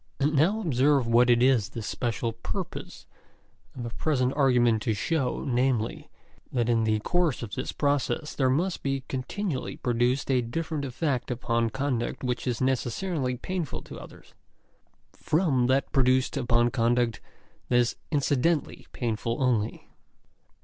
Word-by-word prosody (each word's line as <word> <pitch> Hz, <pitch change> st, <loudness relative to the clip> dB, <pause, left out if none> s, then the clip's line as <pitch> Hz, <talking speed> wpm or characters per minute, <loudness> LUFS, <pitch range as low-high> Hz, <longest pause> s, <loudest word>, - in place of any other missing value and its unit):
And 145 Hz, +2 st, +2 dB
now 175 Hz, +10 st, +3 dB
observe 140 Hz, -, +3 dB
what 120 Hz, +2 st, +4 dB
it 120 Hz, 0 st, +5 dB
is 125 Hz, -6 st, +3 dB
the 115 Hz, -, -6 dB
special 115 Hz, +1 st, -2 dB
purpose 115 Hz, -, -6 dB, 0.7 s
of 125 Hz, -, -6 dB
the 120 Hz, -, -5 dB
present 130 Hz, -1 st, 0 dB
argument 120 Hz, -5 st, +3 dB
to 110 Hz, -1 st, 0 dB
show, 135 Hz, +4 st, -1 dB
namely, 125 Hz, -3 st, 0 dB, 0.4 s
that 120 Hz, -2 st, 0 dB
in 115 Hz, -2 st, +2 dB
the 110 Hz, 0 st, +2 dB
course 170 Hz, -1 st, 0 dB
of 110 Hz, -, -6 dB
this 130 Hz, -, -3 dB
process 145 Hz, +1 st, -1 dB
there 130 Hz, -2 st, +2 dB
must 170 Hz, +8 st, 0 dB
be 135 Hz, -1 st, -2 dB
continually 135 Hz, +4 st, -3 dB
produced 125 Hz, +3 st, 0 dB
a 130 Hz, -1 st, +3 dB
different 150 Hz, +4 st, -3 dB
effect 130 Hz, -1 st, -2 dB
upon 115 Hz, -1 st, 0 dB
conduct 130 Hz, -1 st, -2 dB
which 125 Hz, 0 st, -2 dB
is 120 Hz, -2 st, -1 dB
necessarily 130 Hz, +2 st, -1 dB
painful 180 Hz, 0 st, -4 dB
to -, -, -9 dB
others, -, -, -14 dB, 0.8 s
from 150 Hz, -7 st, +1 dB
that 135 Hz, +1 st, +1 dB
produced 130 Hz, 0 st, +2 dB
upon 120 Hz, -2 st, +2 dB
conduct 120 Hz, -1 st, +1 dB, 0.5 s
that 125 Hz, -, +2 dB
is 120 Hz, -1 st, +3 dB, 0.2 s
incidentally 145 Hz, +2 st, 0 dB
painful 115 Hz, -1 st, -2 dB
only. 120 Hz, -5 st, 0 dB
130 Hz, 140 wpm, -27 LUFS, 120-140 Hz, 0.8 s, it